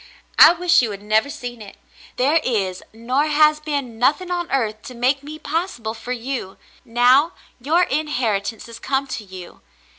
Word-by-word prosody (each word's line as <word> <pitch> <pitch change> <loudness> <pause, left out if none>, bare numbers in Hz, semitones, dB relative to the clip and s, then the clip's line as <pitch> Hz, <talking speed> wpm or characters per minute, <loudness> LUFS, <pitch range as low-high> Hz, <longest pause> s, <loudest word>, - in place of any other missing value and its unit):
I - - +10
wish 350 -2 +3
you 235 - -1
had 200 -1 -8
never 215 +6 +1
seen 245 -4 -7
it. 200 -2 -12 0.4
There 285 +6 +3
is, 195 -7 -1
nor 250 +7 -1
has 305 0 +4
been, 285 -7 -4
nothing 305 +9 +1
on 350 -1 -2
earth 220 -5 -1
to 255 - -9
make 260 +4 +1
me 300 +2 -9
possible 310 - -3
for 230 +2 -8
you, 245 -5 -4 0.3
now 250 +7 +3
— - - -33
your 325 +7 +2
inheritance 240 - -2
has 230 -1 -11
come 270 0 -1
to 245 -5 -6
you. 185 -3 -12
255 Hz, 175 wpm, -21 LUFS, 225-300 Hz, 0.4 s, I